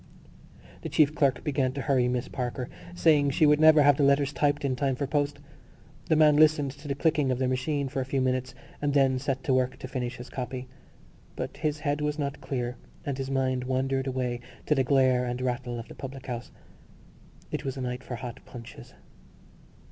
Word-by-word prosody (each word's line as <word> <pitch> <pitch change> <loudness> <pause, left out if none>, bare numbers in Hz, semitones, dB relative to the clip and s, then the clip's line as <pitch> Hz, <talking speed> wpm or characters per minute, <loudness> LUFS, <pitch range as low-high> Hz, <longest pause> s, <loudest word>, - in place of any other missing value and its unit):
The - - -5
chief 150 -1 +3
clerk 140 -3 +1
began 135 -3 0
to 140 - -4
hurry 130 -3 +2
Miss 125 0 -1
Parker, 125 0 -4 0.3
saying 150 -5 +4
she 145 +3 +3
would 150 0 +5
never 155 -1 +7
have 145 -1 +5
the 145 - +2
letters 140 0 +3
typed 145 -1 +1
in 130 -2 0
time 135 0 0
for 140 - -2
post. 145 +1 0 0.7
The 160 - +3
man 150 -1 +5
listened 150 -3 +4
to 145 +2 -12
the 140 - -1
clicking 150 -2 +1
of 125 - 0
the 130 0 0
machine 140 +2 -1
for 135 0 -2
a - - -3
few 135 +1 -1
minutes 130 0 -1 0.3
and 145 -1 0
then 135 -2 +4
set 135 0 -2
to 140 - +1
work 130 0 +1
to - - -7
finish 125 -1 -3
his 125 - -9
copy. 130 0 -5 0.7
But - - -5
his 150 -1 -2
head 145 -1 -1
was 150 0 -1
not 140 -1 -3
clear 125 -2 -3 0.3
and 140 - -2
his 135 0 -3
mind 130 -2 0
wandered 135 +1 0
away 125 -2 -2 0.3
to - - +3
the 135 -2 +2
glare 130 -1 +3
and 125 0 -3
rattle 125 -1 -2
of 115 - -8
the - - -10
public 135 0 -8
house. 120 -2 -5 1.0
It - - -3
was 135 0 -4
a - - -4
night 125 0 -4
for 125 - -5
hot 120 0 -7
punches. 115 -2 -11
135 Hz, 210 wpm, -28 LUFS, 130-145 Hz, 1.0 s, never